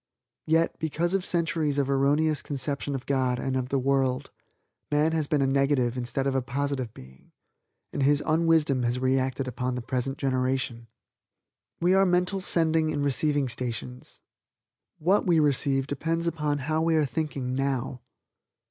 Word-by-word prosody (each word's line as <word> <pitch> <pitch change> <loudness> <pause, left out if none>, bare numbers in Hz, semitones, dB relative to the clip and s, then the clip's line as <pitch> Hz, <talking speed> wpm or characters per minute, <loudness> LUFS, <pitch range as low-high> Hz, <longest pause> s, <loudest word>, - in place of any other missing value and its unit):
Yet, 165 +1 +2
because 165 +3 -1
of 195 -2 +1
centuries 160 -4 0
of 140 -2 +1
erroneous 145 +3 +2
conception 140 0 -3
of 130 - -6
God 130 -2 +1
and 130 +1 -2
of 130 -1 -2
the 140 - +1
world, 135 0 0 0.6
man 150 +2 +3
has 160 -2 0
been 150 -3 +1
a - - +3
negative 135 -2 +1
instead 125 +2 -2
of 135 - +1
a 135 - +1
positive 130 -1 -2
being, 65 -7 -16 0.6
and - - -2
his 145 +2 +3
unwisdom 160 -4 +2
has 120 +1 0
reacted 130 0 0
upon 125 0 -3
the 125 - -3
present 130 +2 -2
generation. 130 -3 -1 0.9
We 175 +2 +3
are 195 0 +4
mental 180 +2 +1
sending 160 -3 +2
and 145 -1 -1
receiving 145 0 +1
stations. 125 0 -6 0.7
What 185 +6 +2
we 170 -2 +4
receive 140 -2 +2
depends 165 +4 -2
upon 150 -3 -1
how 155 +1 0
we 165 0 +2
are 155 -2 +3
thinking 140 -3 -3
Now. 130 -2 -2
140 Hz, 155 wpm, -27 LUFS, 130-155 Hz, 0.9 s, are